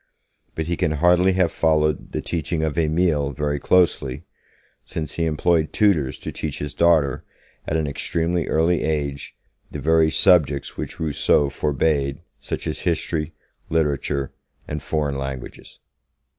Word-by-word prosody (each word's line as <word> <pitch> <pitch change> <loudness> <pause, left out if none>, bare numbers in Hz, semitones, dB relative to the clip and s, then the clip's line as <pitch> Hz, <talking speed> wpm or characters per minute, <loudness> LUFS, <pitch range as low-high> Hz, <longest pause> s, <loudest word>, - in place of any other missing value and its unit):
But 80 - -2
he 85 +2 -1
can 75 - +1
hardly 90 +4 +4
have 90 -3 +2
followed 75 -2 +1
the - - -3
teaching 80 -1 -2
of 80 -2 -1
'Emile' 80 -3 +1
very 75 +1 -1
closely, 75 -6 +2 0.6
since 75 -2 -5
he 85 - -1
employed 80 0 +1
tutors 85 -11 +2
to - - -5
teach 75 -3 -4
his 75 -1 -5
daughter, 80 -6 +3 0.4
at 80 - 0
an 80 - 0
extremely 85 +4 -1
early 80 +1 +2
age, 70 -3 -2 0.3
the - - -6
very 80 +2 +3
subjects 75 -5 +3
which - - -6
Rousseau 75 -2 +2
forbade, 70 0 0 0.2
such - - -5
as 80 - -3
history, 80 -2 -1 0.4
literature 75 -3 0 0.4
and 75 0 -4
foreign 75 -3 -2
languages. 70 -2 -7
75 Hz, 140 wpm, -22 LUFS, 70-85 Hz, 0.6 s, hardly